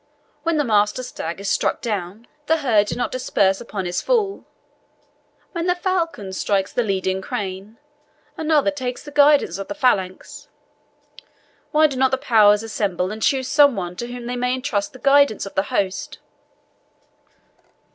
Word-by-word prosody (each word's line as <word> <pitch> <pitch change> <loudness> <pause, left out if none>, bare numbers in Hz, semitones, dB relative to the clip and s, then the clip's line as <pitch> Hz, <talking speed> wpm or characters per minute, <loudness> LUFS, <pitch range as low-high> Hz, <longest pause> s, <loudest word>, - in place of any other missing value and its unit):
When 330 +1 0
the 295 - +2
master 210 0 +1
stag 170 -8 -6
is 200 - -6
struck - - 0
down, 210 -1 -4 0.2
the 320 - +3
herd 210 -4 +3
do - - -3
not 245 - -2
disperse 200 -6 +1
upon 205 -5 -5
his 175 0 -2
fall; 430 -5 0 1.1
when 340 0 -3
the 360 - +2
falcon 335 - -2
strikes 195 0 -1
the - - +1
leading 190 -3 -1
crane, 195 +3 -5 0.6
another 305 -2 +2
takes 255 -4 -5
the 295 - -10
guidance 285 - +4
of 195 - -5
the - - -5
phalanx. 195 -10 -1 1.2
Why 310 0 +4
do 285 -4 0
not 265 0 +3
the 265 - 0
powers 215 -4 +4
assemble 195 -4 -2
and 220 +1 -7
choose 260 +1 +1
some 285 -3 +5
one 180 -2 -4
to 240 - -4
whom 245 -1 -7
they 245 +1 -3
may 250 +1 0
entrust 240 -5 -2
the - - -11
guidance 280 -5 +3
of 195 - -9
the - - +2
host?" 245 +10 -2
240 Hz, 165 wpm, -21 LUFS, 195-285 Hz, 1.2 s, some